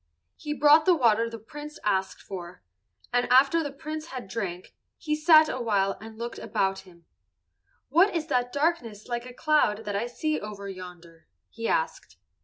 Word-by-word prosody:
He 295 0 -5
brought 300 +2 +6
the 365 - +5
water 230 -5 +3
the 230 - -7
Prince 295 +7 -10
asked 190 -2 -1
for, 180 - -8 0.5
and 245 0 +1
after 275 +6 +5
the 290 -3 -4
Prince 310 +3 -6
had 255 -8 -7
drank, 190 -4 -5 0.2
he 305 -3 -1
sat 310 0 +6
awhile 205 -7 0
and 220 0 -10
looked 235 +1 -6
about 195 -3 -1
him. 170 -2 -21 0.8
"What 350 +8 +4
is 320 -2 -1
that 250 -5 0
darkness, 280 -9 -1
like 240 0 -4
a 250 - -10
cloud, 240 -9 +2
that 205 -1 -3
I 220 +4 -1
see 305 +5 -2
over 205 -1 -7
yonder?" 180 -3 -11 0.2
he 230 0 -4
asked. 130 - -2
235 Hz, 170 wpm, -27 LUFS, 200-300 Hz, 0.8 s, brought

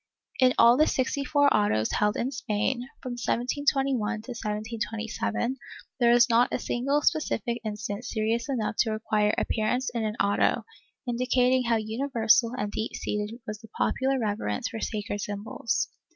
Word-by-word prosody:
In 255 -1 +5
all 235 +1 +7
the 310 - +4
sixty 265 +2 0
four 285 +1 +3
autos 115 - +2
held 210 0 +1
in 255 +3 -1
Spain, 240 0 -2 0.2
from 255 - -4
1721 245 -2 0
to - - -13
1727, 225 +2 -3 0.4
there 235 -1 +5
is 240 +1 +6
not 240 0 +3
a - - 0
single 275 +4 0
specific 235 -6 0
instance 210 +2 -4
serious 225 +3 -1
enough 230 -5 -1
to 230 - +3
require 215 -1 +1
appearance 245 +4 0
in 230 -2 -1
an 215 0 -2
auto, 200 -2 +2 0.4
indicating 250 +1 +2
how 230 0 +2
universal 225 +1 +2
and 205 -2 -2
deep 220 +2 -3
seated 210 +3 -3
was 215 -1 -6
the 225 - -12
popular 270 +1 +1
reverence 205 - -2
for 225 - -6
sacred 205 -2 -3
symbols. 205 +3 -2
230 Hz, 150 wpm, -27 LUFS, 215-255 Hz, 0.4 s, all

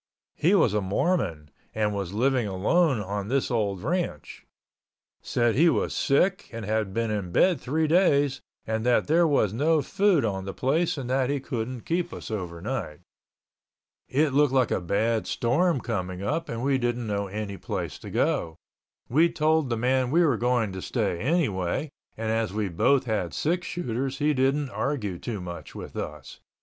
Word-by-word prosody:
He 175 +6 +3
was 120 - +3
a 105 - +1
Mormon 95 - -1 0.2
and 105 -1 +1
was 100 -3 -3
living 125 +2 +1
alone 130 - +2
on 100 0 -4
this 135 +2 0
old 100 -5 -1
ranch. 170 - -3 0.7
Said 120 -1 +1
he 165 +8 +5
was - - 0
sick 185 +8 +1
and 115 -2 -6
had 110 -1 -1
been 115 +2 -1
in 100 -4 -3
bed 175 - +3
three 155 +5 0
days 145 -5 +3 0.2
and 110 0 -2
that 125 0 +3
there 165 +3 +4
was 120 -9 +2
no 150 +5 +2
food 195 - +2
on 95 -3 -2
the 95 - -6
place 155 +6 +1
and 135 -3 -4
that 130 0 +1
he 140 0 0
couldn't 125 -2 -4
keep 175 +1 -1
us - - -7
overnight. 90 - -4 1.1
It 150 +3 +2
looked 145 -1 +3
like 130 -3 +3
a - - 0
bad 110 +5 0
storm 150 +6 +1
coming 95 -5 -4
up 160 +10 -2
and 115 +1 -4
we 135 -1 +2
didn't 120 -1 -1
know 100 -2 -2
any 100 0 -5
place - - -4
to - - -9
go. 80 -1 0 0.5
We 160 +7 +4
told 155 -3 +1
the 115 - 0
man 130 +2 +1
we 170 +5 +4
were 140 -6 +3
going 120 -2 +1
to 95 0 -6
stay 85 - -1
anyway, 135 - 0 0.3
and 110 0 -2
as 110 -2 0
we 105 -1 -2
both 130 +10 +3
had 105 -8 -2
six 175 +4 -1
shooters 135 -4 -3
he 150 +1 +2
didn't 135 +1 +1
argue 105 -13 -2
too 110 -5 -4
much 85 -1 -8
with - - -8
us. 75 -2 -6
120 Hz, 180 wpm, -26 LUFS, 105-145 Hz, 1.1 s, he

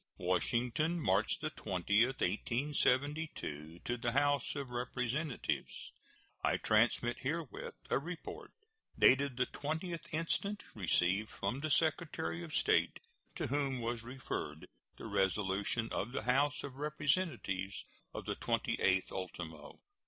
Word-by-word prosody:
WASHINGTON, 125 - +1
March 100 -7 +2
20, 105 - +2
1872. 130 - 0
To 120 - 0
the 120 0 -1
House 145 0 +2
of 140 -3 -4
Representatives: 125 +3 -2 0.5
I - - +3
transmit 120 +2 +3
herewith 150 0 -3 0.2
a - - +4
report, 170 +3 -7 0.5
dated 135 -1 +5
the 125 - +3
20th 160 +5 -4
instant, 170 +6 -1
received 95 +1 +2
from 110 +7 -2
the 155 +2 -2
Secretary 150 - +1
of 80 - -8
State, - - +3 0.4
to - - -2
whom 135 -1 0
was 120 0 -2
referred 115 - -5 0.3
the - - -8
resolution 100 +3 +1
of 120 +5 -2
the 110 - -2
House 140 +5 +2
of 135 -2 -7
Representatives 145 - -1 0.3
of - - -6
the - - -1
28th 95 -1 +1
ultimo. 85 -5 -6
125 Hz, 115 wpm, -35 LUFS, 100-145 Hz, 0.5 s, dated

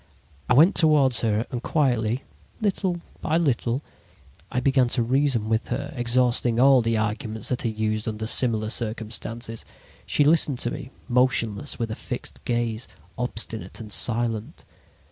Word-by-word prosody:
"I 125 - +4
went 165 +9 +6
toward 150 -6 +4
her 110 0 0
and 120 - -4
quietly, 125 -5 0 0.4
little 190 -4 -1 0.2
by 160 - +1
little, 135 -4 0 0.7
I 125 - 0
began 130 -1 +3
to 120 0 +1
reason 130 -2 +1
with 110 0 0
her, 140 +5 -4
exhausting 120 -1 +2
all 135 0 +6
the 115 0 0
arguments 110 0 -2
that 125 - -2
are - - +2
used 110 0 -2
under 110 0 -3
similar 110 -2 +2
circumstances. 115 0 -3 0.4
She 145 - +2
listened 150 -3 +3
to 120 - 0
me, 125 - -7 0.2
motionless, 125 -2 +1
with 115 -2 -3
a - - -3
fixed - - -7
gaze, 120 -1 -2 0.3
obstinate 115 -2 -2
and 110 -2 -9
silent. 115 -1 +1
120 Hz, 145 wpm, -24 LUFS, 110-130 Hz, 0.7 s, went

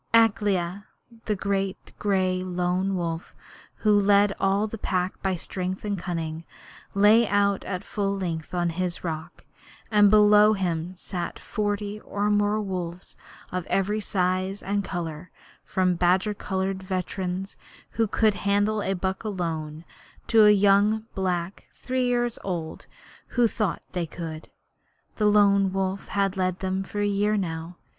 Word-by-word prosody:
Akela, 205 -4 +2 0.4
the 210 - 0
great 195 -1 -2
gray 185 -3 +1
Lone 180 +1 -1
Wolf, 170 -2 -4 0.4
who 210 -1 +3
led 200 0 +4
all 195 +2 +2
the 220 0 -6
Pack 185 -1 -2
by 190 -1 0
strength 185 +3 -4
and 205 -1 -1
cunning, 165 -3 -4 0.5
lay 210 +3 +6
out 200 -1 +2
at 185 0 -4
full 200 -1 -2
length 165 -4 -4
on 175 -1 +1
his 175 +1 -2
rock, 160 -2 -6 0.5
and 205 -1 +6
below 210 0 +6
him 180 -2 -2
sat 180 -1 -5
forty 205 -1 -3
or 205 0 -1
more 205 +1 +2
wolves 180 -3 -5 0.4
of 180 -1 -3
every 205 +2 +1
size 185 0 -1
and 200 +1 -1
colour, 170 -2 -5 0.3
from 185 -1 +1
badger 180 +4 +2
coloured 190 -1 -2
veterans 185 0 -3 0.4
who 225 -1 +1
could 215 +1 +2
handle 205 +2 +1
a 195 - 0
buck 190 +2 -3
alone, 165 -6 -4 0.4
to 220 -2 +6
young 205 +2 +4
black 180 -1 -2
three 255 -1 -1
year 240 0 +2 0.2
olds 170 -4 -4 0.4
who 240 -2 +2
thought 210 -4 -2
they 175 -2 -2
could. 160 -1 -7 0.7
The 210 - +3
Lone 200 -2 +4
Wolf 195 0 -2
had 195 -1 0
led 185 -1 0
them 190 0 -2
for 205 +2 -4
a - - +2
year 205 +1 +1
now. 165 -2 -4
195 Hz, 140 wpm, -25 LUFS, 180-205 Hz, 0.7 s, lay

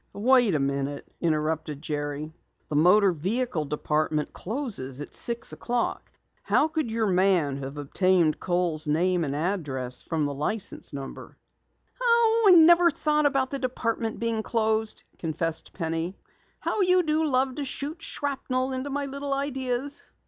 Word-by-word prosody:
"Wait 240 -3 +4
a - - +2
minute," 140 +1 -2
interrupted 155 -2 -1
Jerry. 145 0 -4 0.4
"The 150 - -3
Motor 185 +6 +5
Vehicle 185 - -1
Department 150 +1 -1
closes 200 - -4
at 145 - -7
six 235 -1 -1
o'clock. 240 0 -2 0.3
How 310 - +2
could 315 -6 -2
your 225 0 0
man 180 -7 +2
have 135 +1 -6
obtained 170 +2 +2
Kohl's 175 -4 -1
name 175 +3 +2
and 140 -2 -2
address 145 -7 -1
from 160 -2 -1
the 145 - -2
license 180 +9 -3
number?" 140 -1 -8 0.6
"I 460 -3 +4
never 340 +1 +7
thought 300 -1 +2
about 270 -2 0
the 275 - -2
department 230 -4 -2
being 230 -1 -1
closed," 220 -1 -1 0.2
confessed 165 0 -3
Penny. 165 +2 -3 0.4
"How 425 - 0
you 365 -1 +4
do 310 0 +1
love 260 -1 +1
to 290 - -2
shoot 290 +4 -5
shrapnel 265 -2 -2
into 260 +2 -3
my 285 +1 -2
little 280 0 -3
ideas!" 270 0 -2
205 Hz, 140 wpm, -26 LUFS, -, 0.6 s, never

